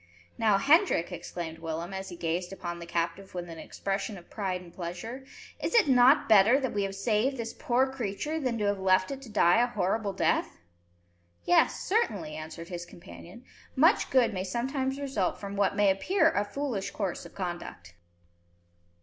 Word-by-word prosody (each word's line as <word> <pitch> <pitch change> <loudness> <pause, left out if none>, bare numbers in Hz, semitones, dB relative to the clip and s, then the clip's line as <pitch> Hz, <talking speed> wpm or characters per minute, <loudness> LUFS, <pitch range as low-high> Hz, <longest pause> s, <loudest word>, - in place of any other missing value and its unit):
"Now, 215 -3 +3
Hendrik," 285 - +3
exclaimed 165 -2 -6
Willem, 165 +3 -5
as 190 0 -5
he 175 - -8
gazed 170 +2 -2
upon 175 -3 -6
the 170 - -8
captive 170 +3 -3
with 175 -1 -4
an 165 -1 -9
expression 195 +4 -4
of 175 - -15
pride 190 -4 -2
and 175 -2 -14
pleasure, 185 +9 -6 0.4
"is - - -1
it 455 -9 +6
not 260 +2 +5
better 220 +5 +6
that 260 -3 -2
we 205 - 0
have 195 0 -2
saved 225 +6 +1
this 230 -1 -4
poor 250 +2 +1
creature 265 +4 -3
than 255 -5 -1
to 210 - -1
have 200 -1 0
left 185 +1 +2
it 275 -1 -6
to 260 - -11
die 205 0 +4
a 245 - +3
horrible 205 -2 -1
death?" - - 0 0.9
"Yes, 175 - +3
certainly," 205 - -1
answered 160 +2 -8
his 175 -1 -5
companion. 175 +5 -13 0.3
"Much 325 - +4
good 245 -4 +3
may 185 -1 -2
sometimes 265 +7 -2
result 265 -10 -1
from 200 0 -6
what 200 -1 +1
may 205 -1 +4
appear 320 - +2
a 205 - +1
foolish 225 -3 -3
course 195 -4 -3
of - - -13
conduct." 175 - -6
200 Hz, 180 wpm, -29 LUFS, 175-250 Hz, 0.9 s, it